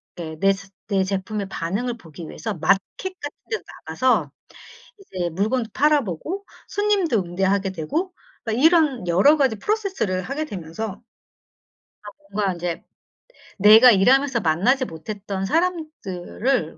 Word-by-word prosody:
데 160 -2 -7
내 195 0 +4
스 195 0 -11 0.2
내 195 -2 +1
제품의 195 +1 -3
반응을 210 +8 -3
보기 165 -5 -11
위해서 220 +5 -5
마켓 180 +4 +3 0.4
같은 290 0 -7
데도 445 - -3 0.2
나가서 255 0 +1 0.7
이제 185 - -4
물건도 220 +7 -1
팔아 300 +1 +4
보고 320 - -5 0.2
손님도 405 - +1
응대하게 190 +2 0
되고 315 - -3 0.3
막 225 - -1
이런 300 - +3
여러 195 - +5
가지 265 -7 +2
프로세스를 385 - -1
하게 285 +9 -3
되면서 200 - -6 1.0
아 210 - -8 0.2
뭔가 200 -2 0
인제 175 -1 -4 0.7
내가 215 +5 +8
일하면서 255 +5 +4
만나지 200 - +2
못했던 195 +3 -5
사람들을 270 - -1
210 Hz, 285 characters per minute, -22 LUFS, 185-280 Hz, 1.0 s, 내가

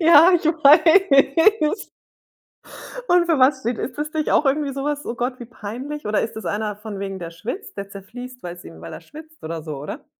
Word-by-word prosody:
Ja, 335 +2 +7
ich 345 - +1
weiß. 315 +3 +4 1.2
Und 355 -1 +4
für 330 -5 +1
was 260 +1 +4
steht 235 -1 -2
ist - - -5
das 300 +1 -3
nicht 310 -1 -1
auch 295 - +3
irgendwie 280 0 0
so 275 - -4
was: 290 0 -2
„Oh 235 - -4
Gott, 250 +2 -3
wie 240 - -8
peinlich?“ 245 +6 -7
Oder 210 0 +1
ist 225 - -4
das 220 - -7
einer 210 0 -2
von 210 -1 -8
wegen, 195 -1 -5
der 170 -1 -7
schwitzt, 240 - -7
der 200 0 -6
zerfließt, 245 +6 -10
weil's 175 0 -8
ihm 80 0 -12
weil 85 - -9
er - - -9
schwitzt 315 +1 -14
oder 160 0 -5
so, 150 -3 -6
oder? 145 +2 -8
260 Hz, 210 wpm, -21 LUFS, 205-305 Hz, 1.2 s, Ja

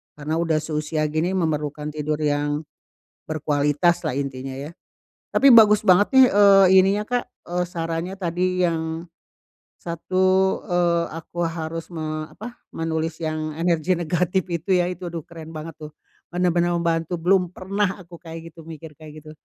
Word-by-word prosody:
Karena 150 +2 -3
udah 165 -2 +1
seusia 155 0 -2
gini, 160 +4 0
memerlukan 150 -3 -2
tidur 150 0 -3
yang 145 0 0 0.6
berkualitaslah, 150 +1 0
intinya 135 -1 -4
ya. 140 +4 -7 0.6
Tapi 275 -1 +5
bagus 210 -2 +7
banget 185 +2 +5
nih, 265 -1 +9
eee, 200 -1 +7
ininya 200 +3 +1
Kak, 245 +2 -1 0.2
eee, 180 +1 -1
sarannya 165 +2 -4
tadi 180 0 0
yang, 160 -1 -2 0.7
satu, 185 +3 +1
eee, 175 -2 +1
aku 170 +1 -4
harus 165 0 -4
me 155 -1 -4
apa, 235 +3 -9 0.2
menulis 165 0 -3
yang 155 -1 -3
energi 170 +1 +1
negatif 175 +2 0
itu, 170 +2 -4
ya. 175 - -1
Itu, 180 0 -6
aduh, 165 - -4
keren 165 -2 -11
banget, 155 0 -8
tuh. 150 -1 -10 0.4
Benar-benar 175 -1 +1
membantu. 165 0 -1
Belum 180 0 +3
pernah 195 +1 -2
aku 170 0 -13
kayak 165 -1 -9
gitu, 165 -1 -13
mikir 160 -1 -10
kayak 155 -1 -12
gitu. 155 - -11
165 Hz, 150 wpm, -23 LUFS, 155-180 Hz, 0.7 s, nih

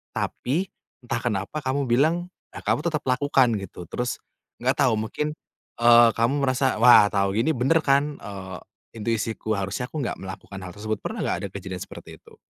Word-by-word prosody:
tapi 165 +10 -2 0.3
entah 120 0 -2
kenapa 105 +4 -2
kamu 135 +1 -1
bilang, 140 +8 +3 0.3
nah, - - -10
kamu - - +1
tetap 150 -3 -3
lakukan 130 -2 +3
gitu, 90 -2 -9
terus 125 +7 -3 0.4
nggak - - +1
tahu 110 - +3
mungkin, 110 +8 -2 0.5
eee, 120 0 +7
kamu 115 +3 +2
merasa, 130 -2 +1
"Wah, 120 -4 +9
tahu 100 0 0
gini 155 +8 +2
bener 140 +6 +2
kan, 140 +1 +2
eee, 95 -3 -8 0.4
intuisiku 110 0 -2
harusnya 100 +6 -3
aku 155 0 -4
nggak 120 - -3
melakukan 95 +1 -9
hal 90 -1 -8
tersebut." 110 +1 -3
Pernah - - -5
nggak - - 0
ada - - -5
kejadian 95 -2 -6
seperti - - -10
itu? - - -20
120 Hz, 170 wpm, -24 LUFS, 100-135 Hz, 0.5 s, Wah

